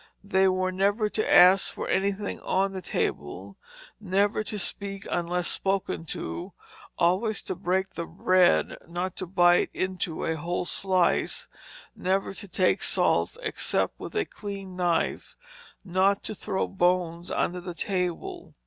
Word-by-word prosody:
They 190 -1 +3
were 185 0 +1
never 200 +3 +1
to 215 - -1
ask 185 +2 +7
for - - -5
anything 200 +1 -1
on 195 +1 0
the 190 - -5
table; - - -3 0.4
never 205 +2 +1
to 210 - -3
speak 195 +1 -1
unless 175 0 -1
spoken 195 -3 -1
to; 85 - -5 0.4
always 190 +5 +1
to - - -3
break 190 +2 -1
the 170 - -5
bread, 185 +1 +3
not 175 +2 -3
to 185 - -4
bite 175 -1 +4
into 185 -3 -2
a 160 0 -1
whole 175 +3 -2
slice; 185 0 +1 0.5
never 190 +1 -1
to 200 - -6
take 185 0 +2
salt - - +2
except - - -1
with - - -8
a 420 -1 +1
clean 195 -3 -7
knife; 175 -2 -1 0.5
not 190 +2 +2
to - - -4
throw 200 -1 -2
bones 175 -2 0
under 180 +1 -1
the 175 -1 -7
table. 190 - -3
185 Hz, 140 wpm, -27 LUFS, 175-195 Hz, 0.5 s, ask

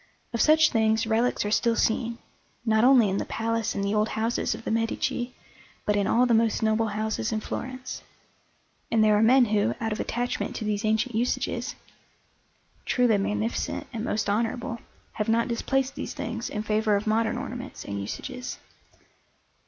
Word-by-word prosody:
Of 235 - 0
such 310 0 +5
things 220 -1 +2
relics 225 +1 +1
are 205 - -1
still 230 +2 +2
seen, 230 +1 0 0.5
not 220 -1 +3
only 250 -4 +6
in 195 0 0
the - - -2
palace 230 0 -1
and 200 - -1
the 200 +1 0
old 215 +1 +2
houses 225 +2 0
of - - -10
the - - -3
Medici, 240 +2 -1 0.5
but 210 - +2
in 200 -1 +1
all 245 +2 +4
the 240 - +2
most 225 -1 +2
noble 220 +1 +2
houses 215 +1 -2
in 220 - 0
Florence; 255 +3 -6 0.9
and 225 -1 +4
there 215 -1 +5
are 210 - +3
men 250 +3 +6
who, 205 - +1
out 225 - -2
of 210 - -3
attachment 245 +1 -2
to 220 - -4
these 210 0 -1
ancient 220 +3 +1
usages, 235 +3 -1 1.1
truly 240 -5 +2
magnificent 215 +3 -2
and 225 -2 -3
most 220 -2 -1
honourable, 230 +4 -1 0.3
have 215 0 -3
not 230 +2 +2
displaced 265 +3 0
these - - -6
things 230 +1 -4
in 210 - -3
favour 215 0 +2
of 200 - -1
modern 220 +1 +1
ornaments 245 +1 -6
and 100 0 -4
usages. 250 - -5
225 Hz, 175 wpm, -26 LUFS, 215-240 Hz, 1.1 s, only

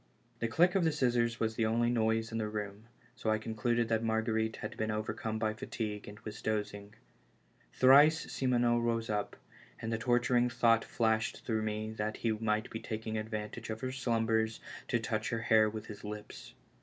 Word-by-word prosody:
The 115 - 0
click 175 +9 +4
of 195 - +2
the 160 - +3
scissors 120 -5 +1
was 110 0 0
the 110 0 +1
only 120 +2 +2
noise 115 -1 +1
in 115 - -2
the 110 - -1
room, 105 0 -5 0.3
so 110 - -2
I 110 - +3
concluded 115 +2 0
that 115 0 +1
Marguerite 110 0 0
had - - -6
been 110 0 -2
overcome 110 +1 -2
by 110 0 0
fatigue 105 -1 -5
and 105 +1 -10
was 110 -1 -8
dozing. 105 -1 -3 0.8
Twice 145 +5 +7
Simoneau 120 -2 +2
rose 115 -1 0
up, 105 -1 -2 0.4
and 110 0 -3
the 110 - -1
torturing 120 +1 +2
thought 115 -1 +3
flashed 110 -1 0
through 110 -2 0
me 110 0 -2
that 110 0 -3
he 115 - 0
might 110 0 -1
be 110 - -4
taking 110 0 -4
advantage 110 0 -4
of 110 0 -4
her 130 -1 -2
slumbers 115 -3 0 0.3
to 120 - +1
touch 110 0 -2
lier 115 -1 -1
hair 110 -1 +4
with 110 0 -6
his 105 - -10
lips. 105 0 -8
110 Hz, 185 wpm, -32 LUFS, 110-120 Hz, 0.8 s, Twice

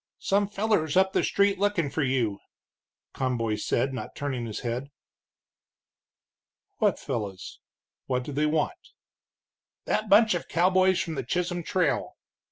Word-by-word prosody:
"Some 200 +1 +1
fellers 200 -7 +1
up 190 0 +4
the - - +2
street 200 -1 +2
lookin' 195 -8 +1
for 160 - -1
you," 125 -7 0 0.7
Conboy 120 -4 -1
said, 130 +5 0
not 130 - -6
turning 130 -5 -3
his 110 - -5
head. 125 +3 -3 1.9
"What - - +3
fellows? 100 -5 -5 0.5
What 125 -1 0
do 145 - -6
they 150 +2 +1
want?" 160 - -2 0.9
"That 215 - -1
bunch 215 +1 +6
of 175 - -3
cowboys 185 +2 +3
from 165 - -2
the 135 -3 -3
Chisholm 175 +6 -1
Trail." - - -1
155 Hz, 135 wpm, -27 LUFS, 125-190 Hz, 1.9 s, bunch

